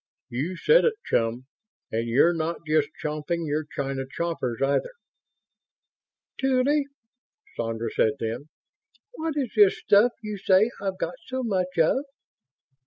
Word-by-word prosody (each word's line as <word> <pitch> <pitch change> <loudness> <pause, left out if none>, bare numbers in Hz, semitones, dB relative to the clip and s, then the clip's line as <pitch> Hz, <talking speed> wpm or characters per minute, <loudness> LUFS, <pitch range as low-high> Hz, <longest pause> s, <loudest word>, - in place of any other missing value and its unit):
"You 150 +10 -3
said 475 - +5
it, 460 -2 +2
chum. 115 +2 0 0.5
And 115 +1 -1
you're 140 +9 +4
not 165 +1 -3
just 155 -2 +2
chomping 155 +3 -2
your 150 +1 -1
china 135 -1 -3
choppers, 165 -9 -2
either." 140 - 0 1.5
"Tuly," 270 +2 +2 0.7
Sandra 115 0 -3
said 110 - +2
then, 115 +6 -4 0.6
"What 320 -9 -4
is 265 -5 -1
this 205 -3 +6
stuff 215 +4 +4
you 210 -1 -5
say 195 +4 +4
I've 195 -2 -2
got 255 +6 -4
so 260 0 -3
much 185 -6 -1
of?" 165 - +3
170 Hz, 130 wpm, -26 LUFS, -, 1.5 s, this